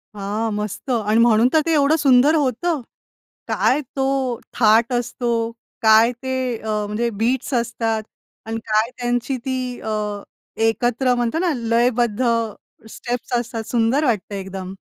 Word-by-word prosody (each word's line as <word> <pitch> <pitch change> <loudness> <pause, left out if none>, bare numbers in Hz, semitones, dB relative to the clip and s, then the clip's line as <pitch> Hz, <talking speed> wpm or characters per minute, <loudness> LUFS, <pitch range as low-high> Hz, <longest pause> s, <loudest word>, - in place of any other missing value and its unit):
हां, 210 +3 -2
मस्त! 210 +5 -5
आणि 220 -2 +1
म्हणून 230 0 +5
तर 315 - +5
ते 330 - +1
एवढं 295 +1 +4
सुंदर 280 0 +4
होतं. 295 +2 0 0.7
काय 275 +4 +2 0.2
तो 270 0 +1 0.5
थाट 230 +1 +4
असतो, 240 0 -2 0.5
काय 220 +2 +6
ते 260 0 -2 0.2
अ, 220 - -8 0.2
म्हणजे 225 +3 -1
बीट्स 255 +3 0
असतात. 225 -2 -1 0.4
आणि 225 0 -3
काय 220 +2 +1
त्यांची 245 +2 -1
ती 260 0 -1 0.2
अ, 210 -2 -3 0.4
एकत्र 245 +2 +1
म्हणतो 240 +4 -1
ना, 345 -1 +1
लयबद्ध 235 0 +1 0.7
स्टेप्स 240 +2 -5
असतात, 230 -1 -4
सुंदर 245 +5 +2
वाटतं 215 -5 -1
एकदम. 190 -1 -6
235 Hz, 135 wpm, -21 LUFS, 220-255 Hz, 0.7 s, काय